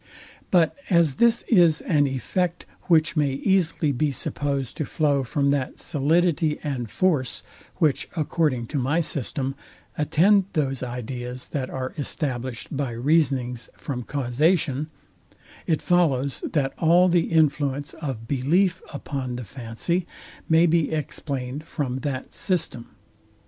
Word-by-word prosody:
But 170 -3 +3
as 170 -7 +3
this 235 0 +4
is 170 -8 +4
an 145 -4 +2
effect, 170 +7 -2 0.2
which 160 -3 +3
may 145 -3 +2
easily 165 -1 +1
be 145 +3 +1
supposed 140 -1 -3
to - - -1
flow 145 -3 +1
from 140 +3 +1
that 140 -2 -1
solidity 155 +1 +1
and 130 -6 -3
force, 150 -8 0 0.3
which, 150 -4 +1
according 150 -6 0
to 145 - -1
my 140 +7 +1
system, 135 -3 -2 0.5
attend 190 +6 +4
those 135 -5 -1
ideas 125 0 -5
that 135 -3 -3
are 130 -1 -4
established 130 -4 -3
by 135 -3 -2
reasonings 130 -2 +1
from 130 -4 -4
causation; 145 +3 0 0.8
it 160 -3 +1
follows, 140 -7 +1
that 140 -4 0
all 175 +3 +5
the 175 -2 +3
influence 145 -3 +1
of 130 -8 -6
belief 175 +8 +1
upon 135 -4 -4
the 125 - -5
fancy 125 - -2 0.4
may 165 +1 +5
be 165 -2 +2
explained 145 -3 -3
from 135 -5 -3
that 135 -2 -4
system. 165 - -2
145 Hz, 130 wpm, -24 LUFS, 130-165 Hz, 0.8 s, all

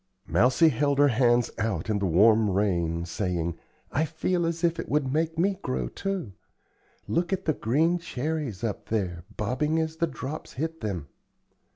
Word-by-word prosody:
Mousie 130 +7 +4
held 140 +1 +1
her 145 0 +6
hands 120 -1 +3
out 110 -1 -1
in 105 -2 0
the 100 - 0
warm 105 +5 +5
rain, 85 -4 0
saying: 85 -2 -2 0.4
"I 155 +4 +1
feel 165 +2 0
as 165 +1 -3
if 170 -1 +2
it - - -5
would 140 -2 +1
make 160 +1 0
me 190 +3 +1
grow, 65 -2 -2
too. 195 - -3 0.8
Look 170 +1 0
at 190 0 -1
the 155 - +2
green 160 +9 +1
cherries 145 - -3
up 110 -3 -3
there, 90 -6 -2
bobbing 130 +9 0
as 160 0 -2
the 170 - +1
drops 150 -1 -6
hit 160 +4 -4
them." 95 -9 -3
130 Hz, 170 wpm, -27 LUFS, 100-160 Hz, 0.8 s, her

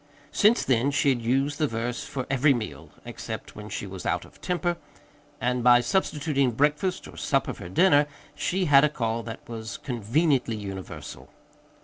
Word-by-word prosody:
Since 210 +8 +4
then 130 +1 +2
she 140 0 +2
had 125 -3 +1
used 135 +5 0
the 155 - +2
verse 115 0 -3
for 130 -2 -4
every 135 +1 +3
meal 80 - -6 0.2
except - - -7
when - - -8
she - - -4
was - - -8
out - - -1
of - - -19
temper 175 -1 -1 0.6
and 125 0 0
by 120 0 +7
substituting 145 -4 0
breakfast 150 - 0
or - - -12
supper - - 0
for 90 - -9
dinner, 145 - +4 0.3
she 185 +1 -1
had 140 -3 +6
a 150 - +4
call 115 -5 -2
that 115 0 -9
was 110 -1 -6
conveniently 125 +1 0
universal. 95 -3 -8
130 Hz, 165 wpm, -26 LUFS, 115-150 Hz, 0.6 s, by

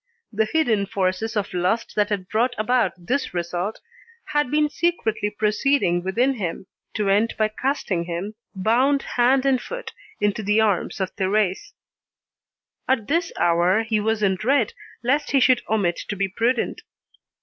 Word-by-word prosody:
The 220 +1 +2
hidden 225 -11 +2
forces 195 +4 -1
of 200 -1 -2
lust 185 +6 0
that 210 0 +2
had 195 -3 -2
brought 240 +5 +1
about 240 +3 +1
this 240 +5 -2
result 175 +4 -3 0.5
had 295 -3 +1
been 300 +2 +2
secretly 290 -10 -1
proceeding 210 -3 +1
within 240 +9 +1
him, 185 -2 -4 0.3
to 210 -2 0
end 205 +4 +2
by 215 -1 +2
casting 215 -7 -2
him, 175 +5 -4 0.2
bound 250 +8 +2
hand 255 +2 +2
and 265 -2 +2
foot, - - -7 0.3
into 205 0 0
the 210 +1 +2
arms 205 -5 +1
of 190 -1 -3
Thérèse. 195 - 0 1.1
At 255 -5 +1
this 335 +3 +1
hour, 175 +5 +3
he 220 -1 0
was 215 0 0
in 195 -1 +3
dread 245 +3 +1 0.3
lest 280 +5 +1
he 275 - +5
should 255 -1 +4
omit 200 -6 +1
to 205 - -2
be 195 0 0
prudent. 230 +5 -1
215 Hz, 155 wpm, -23 LUFS, 195-255 Hz, 1.1 s, he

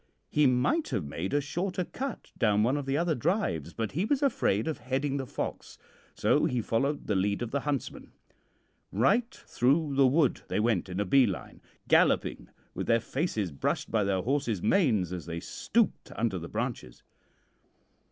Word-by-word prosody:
He 150 -1 +4
might 130 - +2
have 105 - -1
made 80 +6 -4
a 145 - +2
shorter 180 +5 -2
cut 270 +5 -6
down 105 -3 +2
one 125 +5 +2
of 145 -2 -3
the 135 +1 +1
other 170 0 +1
drives, 130 - -1
but 110 +3 -3
he 170 +7 -1
was 275 +6 +1
afraid 135 - +1
of 160 - -2
heading 135 +3 -1
the 135 -2 -4
fox, - - -5 0.4
so - - +3
he 125 - 0
followed 135 +6 -1
the 105 - 0
lead 100 +4 0
of 120 - -5
the 140 - 0
huntsman. 140 -1 -4 0.8
Right 205 - +2
through 145 - 0
the 135 -1 +5
wood 145 +1 +2
they - - -1
went 105 -4 +1
in 90 +1 -4
a 105 - +1
bee 130 +6 +5
line, 95 -4 -6 0.3
galloping - - +2 0.2
with - - -4
their 115 - +4
faces 115 - -2
brushed 70 - -2
by 110 -2 +2
their 95 -2 0
horses' 120 -6 -1
manes 110 - +2
as 85 -3 -6
they 85 0 -4
stooped 225 - -1
under 110 -5 -1
the 85 0 -8
branches. 115 - -4
125 Hz, 180 wpm, -29 LUFS, 105-150 Hz, 0.8 s, the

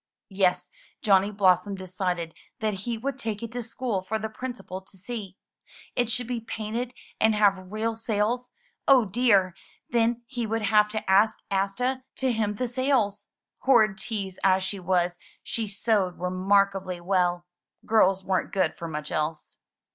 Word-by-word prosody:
Yes, 190 -2 +2 0.4
Johnny 200 -3 +4
Blossom 195 -1 +3
decided 180 -3 -3 0.3
that 215 -1 0 0.2
he 230 - -1
would 270 +3 -4
take 220 -2 -4
it 230 - -5
to 245 +1 -3
school 230 -3 -2
for 210 +4 -2
the 220 0 -4
Principal 240 -5 -6
to 190 0 -16
see. 200 -2 -7 0.6
It 245 -2 +1
should 245 +1 +2
be 240 -1 -3
painted 225 +2 -4 0.2
and 220 0 +4
have 195 -3 +2
real 220 +2 -1
sails. 225 +2 -1 0.4
Oh, 260 -4 +7
dear! 200 -3 +3 0.4
Then 235 0 +2
he 240 -2 -3
would 225 0 -1
have 210 0 +4
to 215 -1 -4
ask 205 +3 +4
Asta 225 +7 0
to 265 -1 0
hem 210 -2 0
the 250 +4 -1
sails! 245 -5 0 0.3
Horrid 220 -6 +4
tease 205 -5 -4
as 190 -1 +4
she 195 +1 -3
was, 175 -1 0 0.2
she 225 -2 -2
sewed 200 -3 +1
remarkably 185 0 +1
well. 175 -1 +1 0.4
Girls 195 -3 +3
weren't 190 -1 0
good 190 - +1
for 170 - -7
much 150 -1 -5
else. 155 0 -3
210 Hz, 155 wpm, -26 LUFS, 190-230 Hz, 0.6 s, Oh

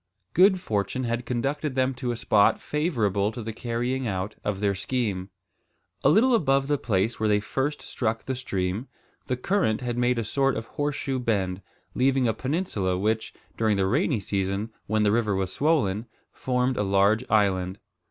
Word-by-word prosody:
Good 190 +1 +5
fortune 105 - -2
had 120 0 -2
conducted 135 +3 -1
them 130 0 +2
to 125 0 -4
a 120 - 0
spot 105 -2 +3
favourable 110 - 0
to 120 - -6
the 110 +1 -5
carrying 120 +3 -2
out 95 0 -2
of 105 -2 -2
their 100 -1 +1
scheme. 100 -2 -2 0.7
A - - +6
little 245 +5 +5
above 135 - +2
the 145 -1 +1
place 105 +2 0
where 110 -1 +1
they 105 0 +4
first 135 +8 -2
struck 115 -2 -2
the 135 - -2
stream, 100 -2 -2 0.4
the 125 - -1
current 150 - +1
had 120 -1 -2
made 125 0 +2
a 115 - 0
sort 135 +5 +1
of 115 - -4
horseshoe 140 -1 -2
bend, 100 -6 -1 0.3
leaving 130 0 +2
a 110 - +2
peninsula, 110 - -1
which, 110 +3 0 0.2
during 110 -2 +1
the 95 - +2
rainy 135 - +1
season 100 +2 -2 0.2
when 110 +1 +1
the 105 - +3
river 110 -3 +1
was 95 -1 -2
swollen, 120 -8 +1 0.2
formed 125 0 0
a 105 - +1
large 100 +4 +3
island. 95 -3 +2
115 Hz, 175 wpm, -26 LUFS, 100-130 Hz, 0.7 s, A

